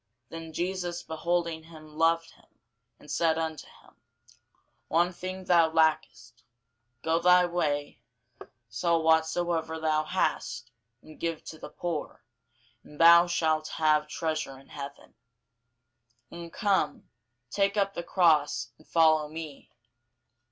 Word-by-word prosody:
Then 165 0 -8
Jesus 175 +1 -3
beholding 170 0 -2
him 155 -2 -14
loved 165 +1 +1
him, - - -24 0.5
and 150 - -12
said 160 +2 +1
unto 160 -2 -4
him, - - -22 0.9
One 175 +5 +2
thing 185 +1 -6
thou 170 -3 +4
lackest: 160 -1 0 0.6
go 165 +1 +1
thy 180 +1 +5
way, 150 -5 -2 0.7
sell 165 - 0
whatsoever 160 0 +1
thou 155 -1 +1
hast, 120 -7 -2 0.3
and 155 - -15
give 165 -2 -3
to 160 - -10
the - - -9
poor, 155 -5 -5 0.6
and 150 - -16
thou 170 +1 +8
shalt 160 -2 0
have 155 -1 +1
treasure 155 -3 -3
in 135 - -18
heaven: 140 -1 -9 1.2
and 170 -1 -9
come, 200 +1 0 0.4
take 200 +1 +1
up 200 -1 +1
the - - -4
cross, 165 -4 +2
and 155 - -21
follow 155 -2 +3
me. 155 -2 -9
160 Hz, 125 wpm, -28 LUFS, 155-170 Hz, 1.2 s, thou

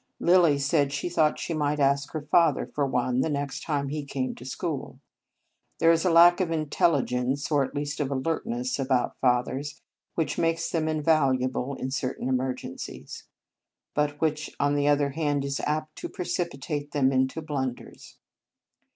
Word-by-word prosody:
Lilly 170 -4 +5
said 140 0 +1
she 140 +5 -2
thought 155 -3 +2
she 170 - -3
might 150 -1 0
ask 140 0 +2
her 155 -2 -3
father 165 +3 +3
for 145 -2 -2
one, 125 0 0
the 160 - 0
next 145 -2 -3
time 140 -3 -2
he 150 +1 -3
came 135 -2 -3
to - - -12
the 130 - -7
school. 150 0 -4 0.8
There 165 0 +5
is 165 -1 +2
a 185 - +3
lack 175 +2 +7
of 180 - 0
intelligence, 140 -4 0
or 145 -2 +4
at 135 - -6
least 145 +1 -3
of 145 -3 0
alertness, 130 -3 -2
about 130 -2 0
fathers, 130 +3 0 0.4
which 165 - -1
makes 165 0 0
them 160 -2 0
invaluable 140 -4 +1
in 130 - -4
certain 130 -2 -3
emergen 130 0 -2
cies; - - -8 0.7
but 150 -1 0
which, 155 -1 -1
on 145 0 +2
the 145 0 +1
other 145 -1 +3
hand, 145 -2 -1
is 140 -1 -2
apt 155 +1 -2
to - - -5
precipitate 150 -5 -3
them 135 -3 +3
into 130 +3 +1
blunders. 135 -5 -5
145 Hz, 170 wpm, -26 LUFS, 135-155 Hz, 0.8 s, lack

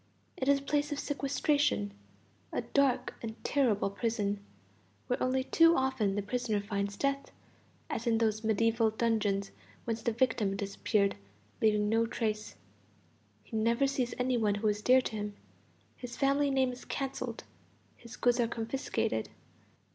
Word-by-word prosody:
It 260 - -3
is 280 - +6
a - - -6
place 290 +1 0
of 290 - -2
sequestration, 285 -6 0 0.6
a - - -2
dark 280 -3 +1
and 220 -1 -5
terrible 225 -8 +2
prison, 205 -2 -1 0.6
where 250 - -1
only 260 +1 +1
too 330 +4 +5
often 260 -7 +1
the 205 - -1
prisoner 225 0 -1
finds 200 -1 -3
death, 275 +2 -1 0.6
as - - -3
in 230 -1 +3
those 220 -1 +1
medieval 225 +1 +2
dungeons 215 -3 0 0.3
whence 230 -1 -2
the 235 - 0
victim 225 -4 +1
disappeared, 200 0 0 0.4
leaving 210 -1 +3
no 225 +2 +2
trace. 215 -2 -2 0.9
He - - -9
never 230 +4 +2
sees 265 -3 -1
any 250 0 +1
who 205 -1 0
are 210 - +4
dear 250 +5 +4
to 230 - -5
him. 205 -1 -4 0.6
His 245 -1 -8
family 280 +1 +2
name 265 -2 +2
is 250 - -9
cancelled, 270 -1 -4 0.5
his 235 0 -12
goods 245 0 +2
are 235 - +3
confiscated. 235 +4 -2
230 Hz, 145 wpm, -31 LUFS, 210-260 Hz, 0.9 s, is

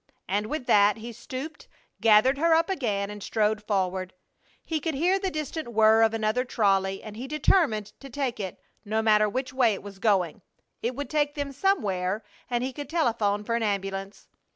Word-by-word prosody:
And 205 +3 -1
with 295 -1 -4
that 205 -1 +4
he 230 +2 -8
stooped, 270 +7 -7 0.3
gathered 225 +5 +5
her 330 +1 +4
up 330 +3 +2
again, 210 - -1
and 210 0 -8
strode 215 +1 0
forward. 185 -3 -2 0.5
He 320 -2 -1
could 320 -1 -2
hear 360 +7 +2
the 385 -1 -1
distant 310 -2 -4
whir 220 +1 +5
of 225 -1 +5
another 220 +3 0
trolley, 195 -5 +1
and 215 -1 -8
he 245 +4 -6
determined 275 - +2
to 275 - -10
take 255 -3 -3
it, 190 -3 -5 0.2
no 220 +1 -1
matter 215 -1 +4
which 255 +5 -3
way 240 -5 +3
it - - -10
was 200 -1 -10
going. 190 -6 +1 0.4
It 240 +2 -2
would 285 +2 -5
take 295 -1 +1
them 285 -1 -3
somewhere 215 - 0 0.3
and 240 0 0
he 260 +1 -3
could 290 -1 -7
telephone 225 -10 +1
for 230 - -2
an 235 - 0
ambulance. 195 -1 -3
225 Hz, 190 wpm, -26 LUFS, 205-280 Hz, 0.5 s, gathered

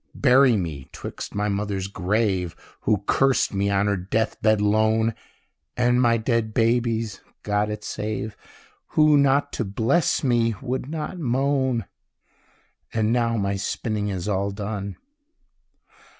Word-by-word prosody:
Bury 130 -3 +5
me 80 -8 -5
'twixt - - -7
my 105 +1 0
mother's 100 -1 -2
grave, 95 -2 -1 0.3
(Who 105 -2 +2
cursed 135 -1 +2
me 100 +1 0
on 100 0 +2
her 100 -1 +1
death 100 +5 -2
bed 110 -1 +3
lone) 110 +2 +2 0.6
And 125 0 +3
my 115 -2 +4
dead 110 -1 -1
baby's 115 -3 +1 0.2
(God 105 0 0
it 105 0 -5
save!) 105 0 -4 0.6
Who, 155 -1 +6
not 140 0 +3
to - - -1
bless 115 - +1
me, 120 -3 +2
would 130 +2 -3
not 160 +3 -4
moan. 130 - 0 1.1
And 110 0 +1
now 115 -1 +1
my 100 -1 -1
spinning 105 +2 -2
is 95 -2 -3
all 100 -1 0
done. 100 -1 -5
110 Hz, 135 wpm, -24 LUFS, 100-120 Hz, 1.1 s, Who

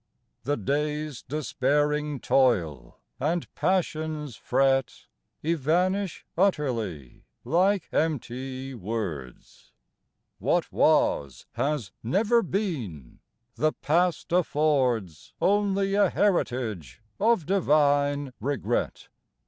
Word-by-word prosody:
The 145 +2 0
day's 150 +4 -2
despairing 150 0 0
toil 85 - +1 0.2
and 165 +3 -1
passion's 155 - -1
fret 135 +1 +1 0.4
Evanish 170 +5 0
utterly 115 - -1 0.2
like 185 +7 +2
empty 135 -3 -2
words; 95 - -6 0.7
What - - 0
was 70 -2 +2
has 135 -2 -2
never 215 - +2
been; 140 - -4 0.3
the 155 +4 +1
past 170 +2 0
affords 135 - 0
Only 200 -1 +2
a 200 -2 +4
heritage 115 - -1 0.2
of 220 -5 +3
divine 145 -6 +2
regret. 140 +4 -2
145 Hz, 80 wpm, -26 LUFS, 120-170 Hz, 0.7 s, a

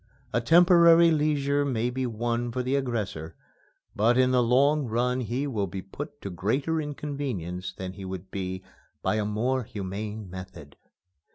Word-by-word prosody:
A 120 - +2
temporary 170 +3 +6
leisure 145 -2 +1
may 125 -3 0
be 130 0 -2
won 120 +1 -2
for 125 +1 -2
the 130 +2 0
aggressor, 105 - -3 0.6
but 115 +4 +3
in 130 0 +4
the 125 -1 +4
long 135 +4 +3
run 125 +3 0
he 125 +4 -2
will 110 -8 -1
be 95 +1 -6
put - - -8
to 100 - -5
greater 135 - 0
inconvenience 135 - -4
than 95 0 -7
he 95 - -9
would 95 0 -7
be 95 -1 -4 0.4
by 110 - +1
a 105 - 0
more 120 +5 0
humane 105 +1 -5
method. 85 -5 -10
120 Hz, 160 wpm, -27 LUFS, 100-140 Hz, 0.6 s, temporary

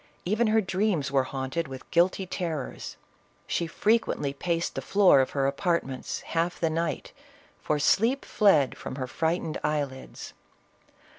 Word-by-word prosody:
Even 215 +5 +2
her 220 +1 +3
dreams 190 -7 0
were 135 -2 +2
haunted 135 +5 -3
with 130 -1 -10
guilty 180 +2 +2
terrors; 165 -6 -4 0.5
she 170 - -1
frequently 205 -8 +1
paced 170 +3 -2
the - - -4
floor 195 -8 +5
of 130 - -1
her 135 - +2
apartments, 140 -2 -1
half 170 +1 -2
the 165 -2 +1
night, 165 +1 -2 0.5
for 150 - 0
sleep 225 - +2
fled 160 - +3
from - - -7
her 130 -2 -3
frightened 160 +3 -2
eyelids. 145 -3 -3
165 Hz, 140 wpm, -27 LUFS, 140-185 Hz, 0.5 s, floor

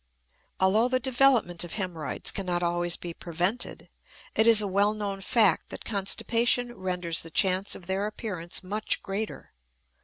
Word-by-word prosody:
Although 205 +5 +4
the 255 0 +1
development 250 -9 +2
of 175 - -6
hemorrhoids 180 -7 -2
cannot 180 -3 -2
always 175 0 0
be 170 -1 -7
prevented, 180 +8 -2 0.5
it 220 - +4
is 225 -2 +7
a 210 - +2
well 200 +2 +2
known 200 -2 -4
fact 205 -4 +3
that - - -9
constipation 235 +4 +1
renders 180 -3 -1
the 165 - -9
chance 190 +2 +1
of 180 - -11
their 190 +3 -1
appearance 185 -6 -4
much 210 +3 -1
greater. 205 +2 -5
195 Hz, 150 wpm, -27 LUFS, 175-220 Hz, 0.5 s, is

